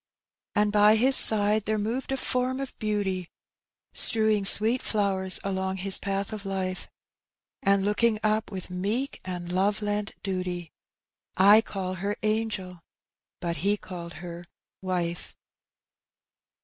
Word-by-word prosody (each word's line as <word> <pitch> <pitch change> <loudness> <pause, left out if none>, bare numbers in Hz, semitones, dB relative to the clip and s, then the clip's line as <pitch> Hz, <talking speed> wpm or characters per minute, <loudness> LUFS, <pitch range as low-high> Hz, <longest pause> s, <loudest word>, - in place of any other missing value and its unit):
« - - -65
« - - -60
And 210 -1 +1
bj 210 +1 +5
his 260 +4 +4
side 210 0 +4
there 215 +1 -1
moved 230 +6 -3
a 270 - -1
form 255 +1 -1
of 275 -2 -6
beauty, 195 -4 -2 0.6
Strewing 215 -2 +5
sweet 220 +5 +5
flowers 195 -3 +1
along 190 -1 -3
his 190 +1 +5
path 195 +1 -3
of 210 -2 -7
life, 190 -2 -4 0.7
And 195 -5 +2
looking 215 +2 +1
up 215 0 0
with 185 -2 -7
meek 210 +9 -3
and 180 -1 -6
love 200 +3 0
lent 205 0 -3
duty: 180 -3 -4 0.7
I 205 +4 +7
call 190 -4 -5
her 205 +1 -2
angel, 215 -4 -2 0.6
but 170 -1 -3
he 200 +7 0
called 170 -4 -9
her 175 0 -9 0.4
wife. 175 -2 -4
200 Hz, 135 wpm, -26 LUFS, 185-215 Hz, 0.7 s, I